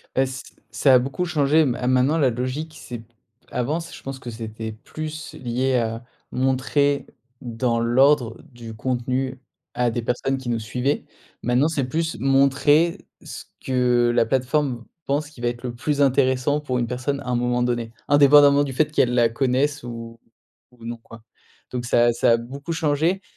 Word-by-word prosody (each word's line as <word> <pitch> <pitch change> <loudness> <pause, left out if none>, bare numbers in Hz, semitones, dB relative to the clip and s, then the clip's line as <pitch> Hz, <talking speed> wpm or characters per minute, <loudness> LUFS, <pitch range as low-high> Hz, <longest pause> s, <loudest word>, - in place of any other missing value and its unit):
Beh, 130 - +3
c 130 +1 -6 0.3
ça 130 +4 +4
a - - +7
beaucoup 135 +8 -2
changé. 155 -2 +3
Ma 125 -1 -2
maintenant 130 +5 +3
la 135 -5 +3
logique 130 +7 -4
c'est 120 -2 -7
p 115 0 -19 0.4
avant 145 +7 -1
c 165 - -9
je - - -12
pense 135 -1 -6
que 125 - -8
c'était 110 -1 -6
plus 155 +8 -7
lié 130 +1 -1
à 115 -1 -1 0.3
montrer 135 +2 +1 0.4
dans 120 0 -1
l'ordre 125 0 +3
du 115 -2 -10
contenu 130 +2 -2 0.4
à 120 -1 +1
des 120 +1 -2
personnes 130 +3 -1
qui 130 -2 -6
nous 115 -1 0
suivaient. 125 +6 -2 0.4
Maintenant 125 +5 +2
c'est 150 -5 -1
plus 160 -2 -2
montrer 140 +5 +3 0.2
ce - - -9 0.2
que 125 -2 +2
la 115 - +4
plateforme 130 0 0 0.2
pense 145 +2 -1
qui 130 - -15
va 120 - 0
être 120 +1 -4
le 125 -2 -4
plus 145 +4 -1
intéressant 135 +1 +2
pour 130 -4 -2
une 120 - -1
personne 130 +3 -2
à 130 - -10
un 125 - +1
moment 120 0 0
donné. 120 -2 -2 0.2
Indépendamment 145 0 +6
du 135 -2 -4
fait 150 +3 +1
qu'elle 125 -5 +2
la 120 -2 +4
connaisse 135 +4 0
ou 115 -1 -8 0.5
ou 115 -2 -15
non, 120 0 -5
quoi. 115 0 -15 0.5
Donc 125 -1 -4
ça 120 0 +3
a 120 - +3
ça 115 - +3
a 115 - +5
beaucoup 140 +7 -6
changé 160 +4 +1
130 Hz, 180 wpm, -23 LUFS, 120-140 Hz, 0.5 s, a